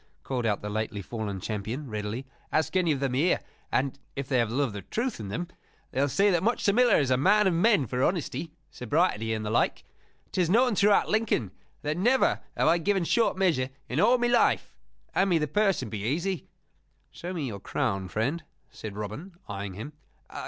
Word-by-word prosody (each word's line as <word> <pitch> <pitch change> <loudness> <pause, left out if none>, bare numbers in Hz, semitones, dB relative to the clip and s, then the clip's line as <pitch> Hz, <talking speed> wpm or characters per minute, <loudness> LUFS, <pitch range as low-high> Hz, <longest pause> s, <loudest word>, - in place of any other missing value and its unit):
called 125 -3 -1
out 105 -2 -1
the - - -3
lately 110 -1 -2
fallen 100 -1 -4
champion, 110 +8 -4
readily. 105 +3 -4 0.3
"Ask 160 +4 0
any 180 -3 +3
of 140 - 0
them 135 -2 -1
here 150 +8 +2 0.3
and 135 +1 0 0.2
(if 140 -1 -4
they 130 -2 +2
have 115 -2 +1
love 130 -4 0
of 100 - -8
truth 240 - -2
in 105 - -5
them) 115 - -3 0.4
they 135 - 0
will 140 - +2
say 200 +8 +3
that 175 -3 +2
Much 230 +5 0
the 200 - +4
Miller 245 +2 +5
is 135 -3 +1
a 130 - +4
man 210 +9 +4
of 190 - +3
men 175 - +4
for 125 +2 -1
honesty, 170 -1 -1 0.2
sobriety, 125 - 0
and 110 -1 -2
the 105 - -2
like! 115 - +1 0.5
'Tis 180 -3 +1
known 240 +5 +4
throughout 205 +1 +4
Lincoln 215 - +1 0.3
that 150 +2 -1
never 245 +8 +3 0.2
have - - +3
I 170 +2 +4
given 195 +2 +1
short 225 +2 +2
measure 160 -9 +2 0.2
in 125 - -2
all 235 +7 +5
my 240 - 0
life. 240 0 +2 0.4
Hand 195 +1 +2
me 175 - +4
the 150 -1 0
purse 200 -4 +2
and 110 - -7
be 110 - -3
easy." 165 - -1 0.6
"Show 175 - -6
me 165 -6 -3
your 105 -6 -5
crown, 95 0 -2
friend," 135 - -1 0.3
said 105 -2 -8
Robin, 110 - -6
eyeing 100 -2 -5
him. 140 +10 -7
145 Hz, 205 wpm, -28 LUFS, -, 0.6 s, Miller